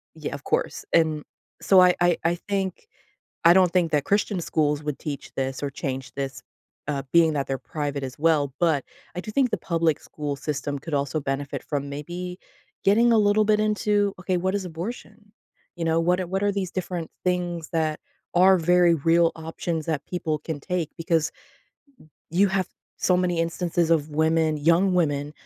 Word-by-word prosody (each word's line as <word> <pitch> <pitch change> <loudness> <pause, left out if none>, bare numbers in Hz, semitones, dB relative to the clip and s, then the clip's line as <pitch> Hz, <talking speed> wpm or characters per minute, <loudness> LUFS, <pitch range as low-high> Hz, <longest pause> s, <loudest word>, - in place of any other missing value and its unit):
yeah, - - -5
of - - -7
course, - - -1
and, 155 -2 +3 0.4
so 190 - +5
I 180 0 +6
I 175 -1 +4
I 170 +1 +2
think 195 - -2 0.6
I 170 - +9
don't 180 -1 +4
think 175 -3 +2
that 145 -2 +2
Christian 200 -2 +1
schools 150 -3 0
would 150 -2 -3
teach 145 -3 -6
this 135 0 -3
or 140 - -1
change 135 -2 -5
this, 135 -3 -4 0.5
uh, 140 -2 -1
being 165 -2 +5
that 140 -2 -1
they're 135 -1 -1
private 145 -1 -4
as 130 -1 -7
well, 150 -3 +2
but 160 -6 +2 0.3
I - - -1
do 215 - -7
think 260 +1 +2
the - - -1
public 165 -3 0
school 145 -2 -5
system 145 0 -3
could 150 +2 -6
also 140 +2 0
benefit 135 0 -3
from 140 -2 -3
maybe 175 +5 -6 0.5
getting 230 +4 +5
a 225 - +5
little 210 0 +4
bit 210 0 +3
into, 210 -1 +1
"Okay, 180 0 0
what 185 +2 -1
is 200 -2 -1
abortion?" 200 +4 -7 0.4
You 170 - -3
know, 165 0 +2
"What 180 +2 +2
a 185 - -2
what 190 +2 -1
are 205 - +2
these 195 -3 -2
different 180 -3 -4
things 175 -3 -1
that 155 -2 0 0.4
are 185 +2 +6
very 175 0 +4
real 165 +2 +3
options 160 0 -4
that 150 -3 -2
people 160 -4 -2
can 160 -3 -5
take?" 175 -1 -2
Because 165 -2 0 1.0
you 190 +5 +3
have 190 -1 0 0.3
so 180 - +2
many 180 -1 0
instances 170 0 0
of 155 -2 +2
women, 160 +1 +2
young 170 +5 +3
women, 145 -4 0
165 Hz, 185 wpm, -25 LUFS, 150-185 Hz, 1.0 s, I